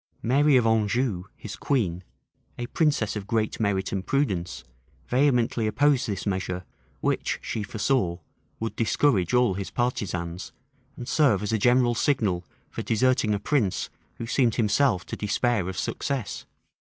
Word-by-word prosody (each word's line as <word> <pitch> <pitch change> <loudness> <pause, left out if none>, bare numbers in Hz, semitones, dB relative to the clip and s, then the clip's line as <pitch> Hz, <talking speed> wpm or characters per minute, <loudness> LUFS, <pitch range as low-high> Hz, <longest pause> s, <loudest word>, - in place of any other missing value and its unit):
Mary 140 +4 +4
of 120 - +3
Anjou, 110 -3 +1
his 105 - -8
queen, 95 -11 -1 0.5
a 120 - -3
princess 140 -6 +1
of 100 -2 -5
great 110 -2 -1
merit 100 -3 0
and 95 -1 -2
prudence, 90 - -1 0.4
vehemently 125 -4 +2
opposed 135 +3 +2
this 100 -3 -3
measure, 95 -2 -2 0.4
which, - - 0
she 110 - -3
foresaw, 105 -3 0 0.4
would 115 0 -3
discourage 115 - +2
all 125 -5 +4
his 95 +1 -4
partisans, 90 -8 -3 0.4
and 120 - -7
serve 130 -10 +3
as 105 - -2
a 110 - +2
general 120 +2 +4
signal 110 -9 +1 0.3
for - - -4
deserting 115 -2 +2
a - - -2
prince 105 -3 0 0.2
who 115 - -6
seemed 120 -1 +2
himself 115 -2 +2
to - - -5
despair 105 -2 0
of 95 - -6
success. 140 -6 -3
110 Hz, 145 wpm, -26 LUFS, 95-125 Hz, 0.5 s, Mary